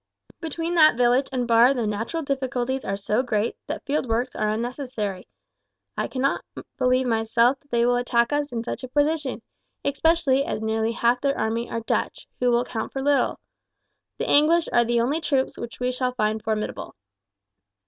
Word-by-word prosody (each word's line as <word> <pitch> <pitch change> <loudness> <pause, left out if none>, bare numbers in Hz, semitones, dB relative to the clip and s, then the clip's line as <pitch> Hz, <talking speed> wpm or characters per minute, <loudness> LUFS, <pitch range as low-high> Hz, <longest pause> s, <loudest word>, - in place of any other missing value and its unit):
Between 330 +1 -3
that 310 -7 +6
village 245 +2 +3
and 250 -2 -1
Barre 235 +3 +5
the 240 -3 -1
natural 225 +11 -2
difficulties 260 -1 -2
are 195 - -2
so 210 +4 0
great 225 -3 -1
that - - -5
field 285 -2 -1
works 240 +3 -1
are 215 0 0
unnecessary. 225 -4 -4 0.7
I - - -1
cannot 270 +1 -1 0.4
believe 255 0 +2
myself 230 +2 +2
that 285 - -33
they 235 -1 +2
will 245 0 +3
attack 240 +1 +1
us 290 0 -1
in 230 -1 -3
such 245 - -5
a - - -4
position, 290 -2 0 0.4
especially 280 -1 +2
as - - -3
nearly 220 +1 -1
half 240 +2 +1
their 280 -1 0
army 225 +2 -1
are 230 - -3
Dutch, - - -2
who 250 - +2
will 240 0 +2
count 225 -3 -4
for 270 - -4
little. 285 0 +2 0.8
The - - -3
English 320 +3 +4
are 240 - +5
the 235 0 +2
only 285 +7 0
troops 270 -4 0
which 235 - -8
we 250 0 0
shall 250 0 -2
find 215 -1 0
formidable." 215 -1 -3
250 Hz, 180 wpm, -24 LUFS, 230-275 Hz, 0.8 s, that